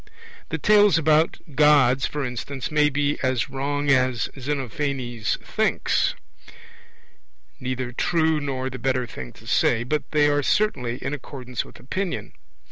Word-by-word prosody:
The - - -2
tales 210 -3 +5
about 155 +1 +3 0.2
Gods, 135 -3 +4
for 150 -2 -3
instance, 130 +3 -5
may 150 -1 +4
be 145 0 0
as 130 +1 0
wrong 145 +1 -1
as 130 -3 +2
Xenophanes 130 -3 -2
thinks, 220 0 +1 1.4
neither 130 -1 -3
true 160 +4 +1
nor 130 -2 -3
the 130 - -7
better 130 0 0
thing 65 - -8
to - - -17
say; 120 0 +2
but 145 +3 -2
they 150 -1 +3
are 145 0 +2
certainly 130 - 0
in - - -2
accordance 130 -3 -5
with - - -15
opinion. 185 +7 -4
140 Hz, 135 wpm, -24 LUFS, 125-150 Hz, 1.4 s, tales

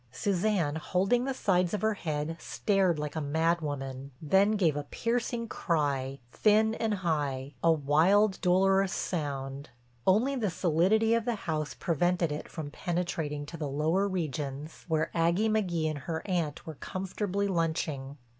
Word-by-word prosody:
Suzanne, 180 -2 0
holding 195 +9 +1
the 270 - -1
sides 180 -4 +1
of 205 - -4
her 220 0 +3
head, 155 -4 -3
stared 195 -5 +1
like 150 0 -4
a 160 - -1
mad 160 +4 +1
woman, 135 -2 -5
then 195 +7 +3
gave 175 -8 +2
a 145 -1 -3
piercing 230 - -2
cry, 140 -8 -1
thin 220 +4 +3
and 225 -2 -1
high, 145 -4 -1
a 165 - +5
wild, 165 +7 +3
dolorous 190 +1 +3
sound. 140 -5 -3 0.4
Only 230 +9 +4
the 225 -6 0
solidity 185 +6 +2
of 230 -1 +1
the 240 -2 0
house 155 -3 -2
prevented 175 0 +1
it 150 - -5
from 150 -3 -6
penetrating 160 -4 -2
to 165 +3 -8
the 150 -3 -3
lower 160 +8 +1
regions 150 -4 -4
where 160 -2 0
Aggie 170 +6 +2
McGee 180 -7 +1
and 150 - -5
her 160 +3 -4
aunt 170 -6 -2
were 160 - -6
comfortably 195 +5 -3
lunching. 160 -6 -2
170 Hz, 155 wpm, -29 LUFS, 150-195 Hz, 0.4 s, a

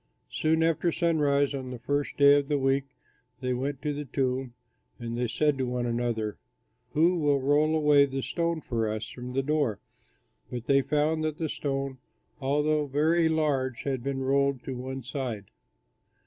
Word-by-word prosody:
Soon 160 +1 +2
after 165 +1 +2
sunrise 145 -5 +2
on 130 -2 -5
the 125 - -6
first 145 +4 -2
day 140 0 +7
of 140 - -5
the 145 -1 +1
week 135 0 +1 0.5
they 125 -1 -1
went 135 +2 -3
to 150 -1 0
the 145 +1 -5
tomb, 130 -1 -2 0.4
and 115 -1 -5
they 120 0 0
said 140 +5 +1
to 130 - 0
one 125 0 -2
another, 115 -3 -2 0.5
"Who 170 +3 +3
will 145 -2 +2
roll 145 +3 +3
away 150 -2 +5
the 135 -1 -4
stone 170 -2 -1
for 115 -5 -1
us 110 +1 -4
from 125 0 -8
the 135 +1 0
door?" 145 -7 0 0.7
But 120 -1 -5
they 140 +1 +4
found 150 +3 +1
that 155 -1 -2
the 160 -2 -2
stone, 135 -2 -3 0.4
although 150 +2 +1
very 160 +4 +2
large, 140 -6 0
had 135 -3 -2
been 135 0 -2
rolled 140 -1 +1
to 135 - -4
one 130 +1 -5
side. 120 -6 -5
140 Hz, 175 wpm, -28 LUFS, 125-150 Hz, 0.7 s, day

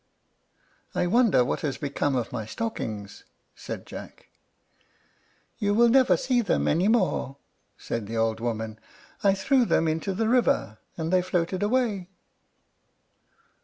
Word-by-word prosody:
"I - - +1
wonder 205 - +4
what - - -2
has 145 -3 -2
become 140 -1 -1
of 120 -3 -2
my 110 -3 -4
stockings," 110 - -5 0.3
said - - -7
Jack. - - -11 1.3
"You 205 0 +1
will 235 +1 +5
never 260 +1 +5
see 255 -2 +1
them 205 - 0
any 175 +6 +2
more," 190 - +1 0.4
said 115 -3 -4
the 115 +1 -4
old 115 0 +1
woman. 110 -2 -3 0.4
"I 195 -1 +4
threw 260 +6 +3
them 165 -7 +2
into 160 +5 -1
the 220 +2 0
river, 235 - +1 0.2
and 165 +1 -2
they 185 - +5
floated 180 0 -1
away." 210 -4 0
180 Hz, 135 wpm, -26 LUFS, -, 1.3 s, will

